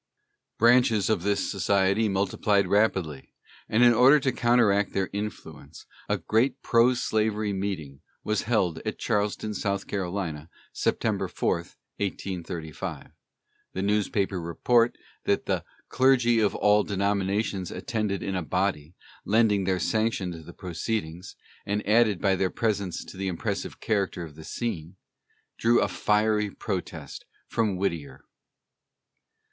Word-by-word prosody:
Branches 115 -3 +4
of - - +1
this 100 -1 0
society 100 +3 +2
multiplied 100 +1 +1
rapidly, 95 -9 0 0.3
and 115 +3 +4
in 120 -1 +7
order 130 +6 +6
to 130 - +1
counteract 115 -5 +2
their 95 -1 -1
influence, 100 -7 -7 0.2
a - - +2
great 120 +4 0
pro 120 +2 +4
slavery 110 -2 0
meeting 90 -9 -4 0.2
was 105 -2 0
held 100 -8 0
at - - -4
Charleston, 105 +1 -1
S. 105 - -5 0.3
C., 95 -3 -2 0.4
September - - 0
4, - - 0
1835. 85 -2 -6 0.6
The 95 - -3
newspaper 100 -2 0
report 115 +8 +2 0.3
that - - +1
"the - - -1 0.2
clergy 125 -3 +3
of 105 -2 +1
all 105 0 +4
denominations 100 -1 -1
attended 105 -4 -2
in 95 - -2
a 90 - -1
body, 90 -2 -2 0.3
lending 105 -3 +3
their 95 -1 +1
sanction 110 -2 0
to 85 - -7
the 80 - -11
proceedings, 90 -1 -4 0.3
and 105 +1 -2
adding 110 -2 +4
by 95 +1 +2
their 95 0 0
presence 100 -3 -2
to - - -11
the 95 0 -2
impressive 90 -3 -3
character 100 -5 -1
of 80 -3 -9
the 80 +1 -12
scene," 90 -8 -4 0.6
drew 120 +1 +4
a - - +2
fiery 105 0 +1
protest 95 -2 -6 0.2
from 110 -4 0
Whittier. 85 -8 -3
100 Hz, 130 wpm, -26 LUFS, 95-110 Hz, 0.6 s, in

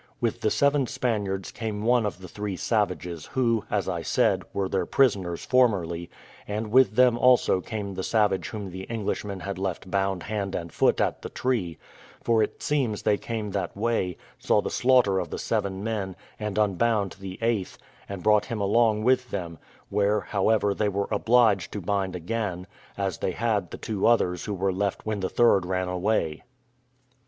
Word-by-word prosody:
With 120 -4 -1
the 110 - +2
seven 140 +2 +2
Spaniards 100 -6 -2
came 105 -2 -4
one 120 -1 +3
of 100 - -5
the 90 - -8
three 105 +1 -4
savages, 90 -6 -1
who, 115 -4 +1
as 100 -2 0
I 85 -3 -2
said, - - +2
were 100 -1 -1
their 95 -2 -1
prisoners 95 -10 +1
formerly; 95 -10 +2 0.4
and 105 +1 -3
with 130 -2 +5
them 125 -1 +5
also 125 -7 +4
came 105 -1 -5
the 95 - -4
savage 105 -2 +1
whom 105 -4 -6
the 95 +1 -8
Englishmen 105 -3 -3
had 95 +1 -5
left 95 -1 -4
bound 95 -2 0
hand 100 -3 -3
and 85 -2 -5
foot - - +3
at - - 0
the - - -6
tree; 105 - -1 0.5
for 115 -2 +3
it 105 - -2
seems 130 -8 0
they 105 -1 +2
came 110 -3 -4
that - - -3
way, 105 -5 0 0.2
saw - - +2
the - - -3
slaughter 125 -7 +3
of 90 -3 -4
the - - -4
seven 95 0 -2
men, 105 -4 -3 0.2
and 105 -1 -3
unbound 105 0 +1
the 95 -1 -7
eighth, 115 -5 -1 0.3
and 100 -2 -6
brought 105 -1 +4
him 115 -4 -4
along 110 +1 +2
with 125 0 +2
them; 85 -5 -5 0.3
where, 105 +1 +2
however, 105 +1 +1
they 105 +1 0
were 100 0 -2
obliged 115 -7 +3
to 105 - -3
bind 95 0 -1
again, 90 0 -3 0.3
as 95 -3 -2
they 95 - -1
had 105 -5 0
the - - -7
two 105 -4 -1
others 90 -7 +2
who 105 - -3
were 95 0 0
left 100 +1 -2
when 110 -1 -2
the 95 - -2
third 115 -5 +4
ran 90 0 -1
away. 90 -4 0
100 Hz, 185 wpm, -26 LUFS, 95-115 Hz, 0.5 s, with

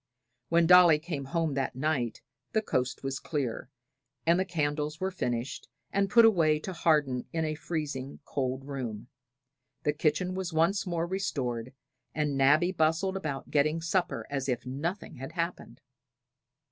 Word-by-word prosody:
When 170 0 +4
Dolly 175 -2 +8
came 150 -3 -5
home 165 +1 -1
that 135 -2 -2
night 130 -5 -1 0.3
the 220 - +3
coast 130 -8 -1
was 135 0 -2
clear, 135 -5 -3 0.6
and 170 +2 +4
the 190 - +1
candles 150 -3 -2
were 190 0 -1
finished 120 -7 -3 0.3
and 195 0 +2
put 235 -2 +7
away 165 -8 +4
to 190 - -5
harden 150 -7 +1
in 160 -1 -1
a 155 - -1
freezing 150 -4 -4
cold 130 -1 -2
room; 125 -5 -5 0.7
the 150 - +2
kitchen 165 +4 0
was 185 -1 -3
once 175 +6 +2
more 170 -1 0
restored, 130 -11 -2 0.4
and 150 -2 0
Nabby 145 +6 +4
bustled 165 +3 +1
about 155 -8 -4
getting 155 +2 +2
supper 170 +2 -1
as 135 -1 -2
if 125 0 -1
nothing 155 +5 -4
had 135 +2 -7
happened. 165 -7 -4
155 Hz, 150 wpm, -29 LUFS, 135-175 Hz, 0.7 s, Dolly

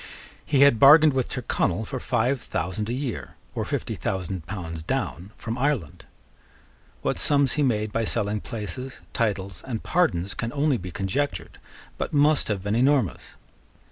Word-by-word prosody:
He 140 -2 +2
had 140 -5 +6
bargained 150 +2 +8
with 130 -2 0
Tyrconnel 110 -5 -1
for 130 +2 -4
five 125 +1 0
thousand 95 +6 -3
a - - -1
year, 130 -2 -4 0.2
or - - -2
fifty - - -3
thousand 95 -3 -3
pounds 85 -5 -5
down, 85 +3 -3
from 115 +2 -4
Ireland. 130 - -1 1.0
What - - 0
sums 140 -3 +3
he 150 - 0
made 110 -6 +1
by 115 0 0
selling 105 -2 -1
places, 125 +3 -6
titles, 100 -5 -1
and 120 -5 -4
pardons, 100 - +1
can 115 0 -3
only 145 -2 +2
be 95 -2 -7
conjectured, 100 +11 -3 0.4
but - - -3
must 150 0 +4
have 100 -3 -2
been 100 +1 -1
enormous. 130 -3 +1
115 Hz, 155 wpm, -25 LUFS, 95-135 Hz, 1.0 s, bargained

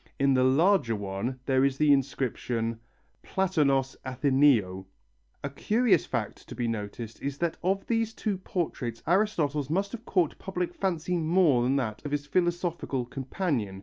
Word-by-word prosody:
In 140 0 +4
the 130 -1 +3
larger 140 - +3
one 100 +6 -4
there 130 -1 +3
is 135 -1 +1
the 150 -1 +5
inscription: 120 -4 -1 0.4
ΠΛΑΤΩΝΟΣ 145 -8 +1
ΑΘΗΝΑΙΟΥ 130 -8 +2 0.6
A 140 - -2
curious 210 - +2
fact 115 -5 -4
to - - -7
be 120 0 -1
noticed 110 +1 -5
is 140 0 -3
that 170 0 -1
of 195 +2 0
these 225 -1 0
two 200 -4 -2
portraits 135 - -3
Aristotle's 155 -7 +1
must 195 +5 0
have 235 0 -8
caught 175 -6 +1
public 180 -2 -3
fancy 180 -2 -1
more 160 -5 +3
than 130 +3 +2
that 110 -6 -2
of 145 - -4
his 145 0 -1
philosophical 175 -5 -1
companion. 130 - -3
140 Hz, 150 wpm, -28 LUFS, 125-180 Hz, 0.6 s, the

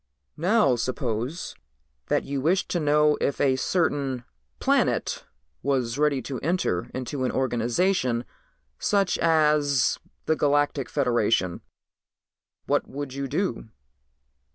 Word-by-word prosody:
"Now 180 - +3
suppose 125 - -3 0.5
that - - +1
you 140 -1 -3
wished 175 +7 +1
to 175 - 0
know 150 0 +3
if 140 - 0
a 135 -2 +3
certain 140 -5 0 0.4
planet - - +1 0.4
was 130 -2 -1
ready 145 -4 +2
to 130 -1 -4
enter 160 - -1
into 130 +1 -4
an 130 - +1
organization 125 +1 0 0.5
such 200 -2 +1
as 150 -4 +3 0.3
the 160 - +2
Galactic 145 -2 +1
Federation, 115 - +1 1.0
what - - +1
would 140 -1 -6
you 140 0 -3
do?" 155 - -2
140 Hz, 110 wpm, -25 LUFS, 125-150 Hz, 1.0 s, Now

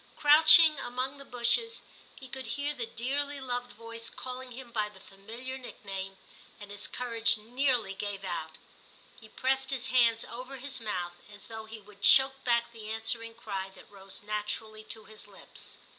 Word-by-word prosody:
Crouching 310 +1 +8
among 255 +3 -3
the - - -8
bushes, 255 - +1 0.3
he 265 - -10
could 260 -1 -5
hear 285 +5 -1
the 240 -5 -3
dearly 280 +5 -1
loved 245 -2 -3
voice 230 +1 -5
calling 255 0 -7
him 245 0 -9
by 215 -2 0
the 200 -2 -16
familiar 230 +7 -8
nickname, 195 -5 -6 0.4
and 205 -1 -10
his 205 0 -2
courage 230 -2 +2
nearly 245 -1 +1
gave 200 0 -4
out; 160 -4 -4 0.6
he 220 - -12
pressed 265 +3 +1
his 265 -3 0
hands 230 -2 +5
over 255 +3 -7
his 270 -1 -4
mouth 175 -5 -3
as 205 0 -10
though 220 -1 -6
he 220 0 -9
would 205 -1 -18
choke 265 +5 +6
back 235 -1 +2
the 220 -2 -9
answering 225 +1 -1
cry 195 -4 -4
that - - -16
rose 195 0 -10
naturally 215 +1 -4
to 215 0 -7
his 215 -1 -10
lips. 200 -2 -9
230 Hz, 170 wpm, -30 LUFS, 210-260 Hz, 0.6 s, Crouching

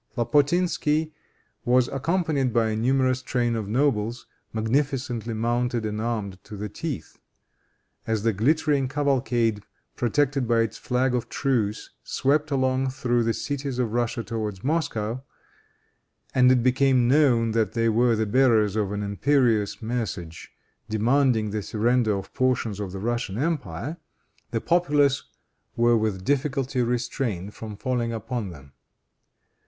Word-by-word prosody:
Lapotinsky 155 +3 +1 0.5
was 125 0 +3
accompanied 145 -2 0
by 115 -1 +2
a - - -1
numerous 130 +2 +1
train 120 -2 0
of 110 -3 -3
nobles, 120 -1 0 0.3
magnificently 120 0 -1
mounted 120 +1 0
and 105 0 -3
armed 105 -5 -3
to 105 0 -9
the 105 +2 -4
teeth. 155 +5 -6 0.9
As 110 -2 0
the 115 -1 +2
glittering 140 +5 +2
cavalcade, 125 -6 0 0.3
protected 135 +2 +1
by 115 -1 +3
its 115 - -2
flag 125 +1 0
of 125 -2 -2
truce, 115 -7 -1
swept 145 +3 +1
along 130 -1 +1
through 120 -2 0
the 115 0 +1
cities 140 -2 -3
of 120 -4 -1
Russia 120 0 -1
towards 110 -4 -4
Moscow, 130 -6 -1 1.1
and 125 -1 +5
it 125 -2 +3
became 130 -1 +3
known 125 -5 +4
that 110 -3 0
they 115 0 +1
were 115 +1 +3
the 110 0 0
bearers 110 -3 +3
of 105 -3 0
an 105 0 -3
imperious 110 0 +1
message, 110 -8 -4 0.4
demanding 115 0 +2
the 105 0 -2
surrender 110 0 +1
of 95 0 -8
portions 120 -5 0
of 100 -3 -4
the 95 - -6
Russian 120 -2 -2
empire, 145 - -2 0.5
the - - -2
populace 145 -5 +2 0.5
were 120 0 +4
with 105 -4 -1
difficulty 135 -2 0
restrained 115 -5 -2
from 110 -2 -8
falling 120 0 -1
upon 115 -1 -4
them. 70 -5 -13
120 Hz, 135 wpm, -25 LUFS, 110-135 Hz, 1.1 s, and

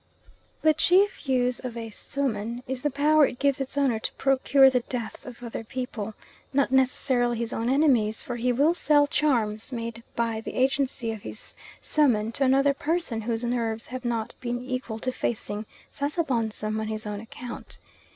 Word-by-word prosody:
The 310 0 +6
chief 360 0 +3
use 250 -1 +2
of 245 -2 -6
a 225 -1 -5
suhman 240 -2 -2
is 260 -1 -3
the 295 - +1
power 295 +1 +4
it 245 - -7
gives 280 +1 +1
its 270 +1 -3
owner 265 -6 +2
to - - -3
procure 270 0 +4
the 260 -1 +4
death 235 -3 -5
of 245 -1 -10
other 230 -1 -5
people, 225 -3 -5 0.4
not 275 -1 +2
necessarily 255 -2 +2
his 235 0 -2
own 230 +2 -1
enemies, 255 -7 +3
for 245 - -4
he 250 +1 +1
will 285 +7 +3
sell 300 -4 +4
charms 235 -8 0
made 230 -1 -5
by 230 -1 -1
the - - -7
agency 260 -2 +1
of 220 -2 -6
his 215 - -7 0.3
suhman 230 -8 +2
to 275 - +1
another 275 +2 +4
person 295 -5 -1
whose 225 +1 -2
nerves 230 -2 -1
have 255 +1 -6
not 230 -2 -2
been 245 0 -3
equal 255 -3 -3
to 255 +3 -2
facing 215 -3 -3 0.2
Sasabonsum 235 -8 -1
on 220 - -3
his 215 0 -3
own 210 -1 -4
account. 240 +2 -9
245 Hz, 175 wpm, -26 LUFS, 225-275 Hz, 0.4 s, The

